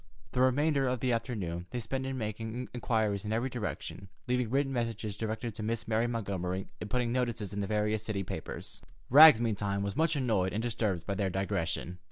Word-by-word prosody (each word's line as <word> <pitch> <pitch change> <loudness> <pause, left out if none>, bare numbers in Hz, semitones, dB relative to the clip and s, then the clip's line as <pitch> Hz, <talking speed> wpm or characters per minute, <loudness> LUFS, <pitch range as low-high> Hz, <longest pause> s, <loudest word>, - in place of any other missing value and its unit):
The 125 - +1
remainder 140 +2 +3
of 125 -1 0
the 125 +1 +1
afternoon 100 -7 -2
they 125 - -3
spent 130 +3 -3
in 135 0 -3
making 115 +2 -4
inquiries 110 -5 0
in 105 - -3
every 120 +4 0
direction, 105 -4 -5 0.2
leaving 125 -2 +1
written 135 +2 +1
messages 115 -4 -2
directed 110 +2 -3
to 105 - -7
Miss 115 +1 -2
Mary 115 +1 +2
Montgomery, 95 -5 -2 0.2
and 105 - -5
putting 125 0 0
notices 120 -5 -1
in 100 - -2
the 100 - -2
various 105 0 +1
city 105 -3 -2
papers. 90 - -5 0.3
Rags, 150 -2 +10
meantime, 100 -3 0
was 100 0 -3
much 165 0 +2
annoyed 110 -9 +1
and 110 +2 -1
disturbed 110 -7 -1
by 100 - -1
their 100 -1 0
digression. 90 -1 -2
110 Hz, 195 wpm, -31 LUFS, 100-125 Hz, 0.3 s, Rags